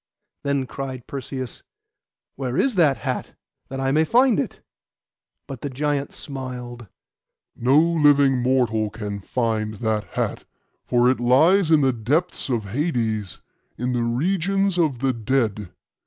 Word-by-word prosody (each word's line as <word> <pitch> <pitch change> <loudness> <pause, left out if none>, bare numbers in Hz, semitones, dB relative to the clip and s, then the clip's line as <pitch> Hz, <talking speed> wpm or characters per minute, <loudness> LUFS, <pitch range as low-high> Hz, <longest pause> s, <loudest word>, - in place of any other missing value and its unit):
Then 140 -2 0
cried 130 -2 -6
Perseus, 130 -2 -6 0.7
'Where 130 -1 -3
is 270 - +2
that 160 -8 +3
hat, - - -4 0.3
that 135 - -5
I 135 0 0
may 155 +3 +4
find 240 - +4
it?' - - -3 0.9
But 135 -3 -8
the 145 - -3
giant 145 +1 -1
smiled. 125 -4 -7 0.7
'No 130 +4 +3
living 145 -5 +4
mortal 120 -4 +1
can 105 -2 -5
find 110 0 -2
that 110 0 -1
hat, - - -2 0.4
for 120 0 +3
it 130 - -2
lies 155 +10 +4
in 160 -2 +5
the 135 -2 +3
depths 140 +10 -1
of 115 -5 -1
Hades, 110 - -2 0.4
in 125 +2 -1
the 120 - 0
regions 185 +9 0
of 155 -7 +2
the 135 -1 +2
dead. 110 -4 -1
130 Hz, 140 wpm, -23 LUFS, 120-150 Hz, 0.9 s, in